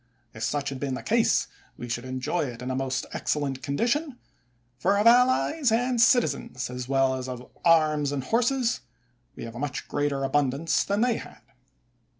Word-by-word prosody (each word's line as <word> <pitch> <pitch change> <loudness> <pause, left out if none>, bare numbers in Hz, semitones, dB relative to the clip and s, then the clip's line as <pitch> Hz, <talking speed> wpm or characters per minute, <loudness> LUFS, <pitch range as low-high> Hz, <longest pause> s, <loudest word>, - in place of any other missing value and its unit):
If 110 - -10
such 145 -1 -1
had 135 -1 -6
been 135 -2 -2
the - - -7
case, 230 +1 +2 0.3
we 120 - -7
should 120 +1 -4
enjoy 130 +6 -2
it 125 -2 -7
in 130 - -3
a - - -2
most 135 0 -2
ex - - -1
cellent 135 -3 -3
condition; 240 - -1 0.6
for 195 +2 +2
of 205 - +1
allies 255 +3 +4
and 245 +1 +1
citizens, 145 - +2
as 125 0 -6
well 135 -1 +3
as 130 0 -4 0.3
arms 155 -4 +3
and 140 -2 -2
horses, 240 - +1 0.6
we - - -8
have 115 - -7
a 120 - -8
much 145 -1 -4
greater 145 -1 -1
abundance 140 +3 +1
that 200 +1 0
they 245 -2 +2
had. 110 - -11
145 Hz, 175 wpm, -26 LUFS, -, 0.6 s, allies